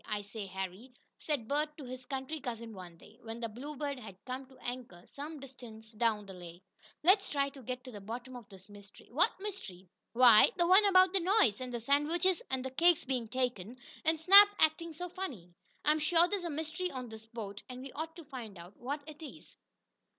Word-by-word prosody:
"I 210 Hz, -1 st, -2 dB
say, 205 Hz, 0 st, -7 dB
Harry," 190 Hz, +6 st, -6 dB, 0.2 s
said 285 Hz, -8 st, -3 dB
Bert 300 Hz, +2 st, -1 dB
to 295 Hz, -, -8 dB
his 255 Hz, 0 st, -8 dB
country 270 Hz, +3 st, -4 dB
cousin 235 Hz, -4 st, -6 dB
one 180 Hz, -3 st, -10 dB
day, 215 Hz, +7 st, -18 dB
when 225 Hz, 0 st, -7 dB
the 235 Hz, -, -2 dB
Bluebird 280 Hz, +4 st, -5 dB
had 205 Hz, -6 st, -10 dB
come 260 Hz, +1 st, -5 dB
to 265 Hz, -, -18 dB
anchor 245 Hz, -8 st, -6 dB
some 295 Hz, +2 st, -8 dB
distance 235 Hz, -5 st, -11 dB
down 215 Hz, -2 st, 0 dB
the 195 Hz, -, -10 dB
lake, 175 Hz, 0 st, -11 dB, 0.4 s
"let's 390 Hz, +4 st, +5 dB
try 280 Hz, -1 st, +1 dB
to 275 Hz, -1 st, -13 dB
get 250 Hz, +1 st, -5 dB
to 255 Hz, -, -10 dB
the 205 Hz, -3 st, -9 dB
bottom 240 Hz, +5 st, -7 dB
of 240 Hz, -3 st, -11 dB
this 190 Hz, -2 st, -12 dB
mystery." 205 Hz, -1 st, -15 dB
"What 310 Hz, +9 st, +4 dB
mystery?" 215 Hz, -, -7 dB, 0.3 s
"Why, 235 Hz, -3 st, +8 dB
the 345 Hz, -, +3 dB
one 375 Hz, +4 st, +6 dB
about 370 Hz, -2 st, +5 dB
the 390 Hz, -, +3 dB
noise, 345 Hz, -, +3 dB
and 255 Hz, -1 st, -5 dB
the 240 Hz, -, -3 dB
sandwiches 315 Hz, +8 st, +2 dB
and 260 Hz, -1 st, -1 dB
cakes 345 Hz, -1 st, +4 dB
being 255 Hz, -3 st, -2 dB
taken, 245 Hz, -2 st, -2 dB, 0.3 s
and 320 Hz, 0 st, +2 dB
Snap 395 Hz, +5 st, +10 dB
acting 330 Hz, +2 st, +2 dB
so 355 Hz, +3 st, -6 dB
funny. 275 Hz, -, -7 dB, 0.3 s
I'm 305 Hz, +1 st, +3 dB
sure 330 Hz, +3 st, +4 dB
there's 390 Hz, -2 st, -2 dB
a -, -, -2 dB
mystery 315 Hz, +4 st, -3 dB
on 255 Hz, -5 st, -6 dB
this 220 Hz, 0 st, -11 dB
boat, 210 Hz, -3 st, -7 dB
and 255 Hz, 0 st, -8 dB
we 270 Hz, -, -8 dB
ought 315 Hz, +3 st, -6 dB
to 335 Hz, -, -10 dB
find 240 Hz, -8 st, -8 dB
out 175 Hz, +3 st, -12 dB
what 285 Hz, +4 st, -4 dB
it 310 Hz, 0 st, -11 dB
is." 310 Hz, -, -11 dB
255 Hz, 210 wpm, -32 LUFS, 220-310 Hz, 0.4 s, Snap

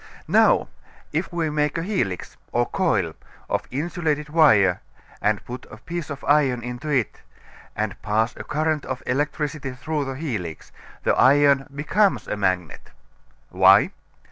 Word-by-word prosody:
Now, -, -, +4 dB, 0.5 s
if 160 Hz, +5 st, -1 dB
we 165 Hz, -3 st, -1 dB
make 150 Hz, 0 st, 0 dB
a 165 Hz, -, -2 dB
helix, 170 Hz, -, -2 dB, 0.2 s
or 120 Hz, 0 st, +2 dB
coil, 110 Hz, -, 0 dB, 0.3 s
of -, -, -2 dB
insulated 150 Hz, +1 st, -2 dB
wire 110 Hz, -, +4 dB, 0.4 s
and 105 Hz, -1 st, 0 dB
put 125 Hz, +1 st, -8 dB
a -, -, -11 dB
piece 175 Hz, -2 st, -6 dB
of 145 Hz, -1 st, -7 dB
iron 135 Hz, -5 st, +2 dB
into 125 Hz, +5 st, -5 dB
it, 130 Hz, -7 st, 0 dB, 0.5 s
and -, -, -3 dB
pass 110 Hz, +3 st, 0 dB
a -, -, -7 dB
current 155 Hz, 0 st, -1 dB
of 130 Hz, -1 st, -5 dB
electricity 145 Hz, +1 st, -2 dB
through 145 Hz, +4 st, -3 dB
the 135 Hz, -, -4 dB
helix, 110 Hz, -, -5 dB, 0.3 s
the -, -, +3 dB
iron 140 Hz, 0 st, +4 dB
becomes 195 Hz, +7 st, +1 dB
a -, -, -2 dB
magnet. 95 Hz, -5 st, -2 dB, 0.6 s
Why? -, -, +6 dB
140 Hz, 145 wpm, -23 LUFS, 120-155 Hz, 0.6 s, Why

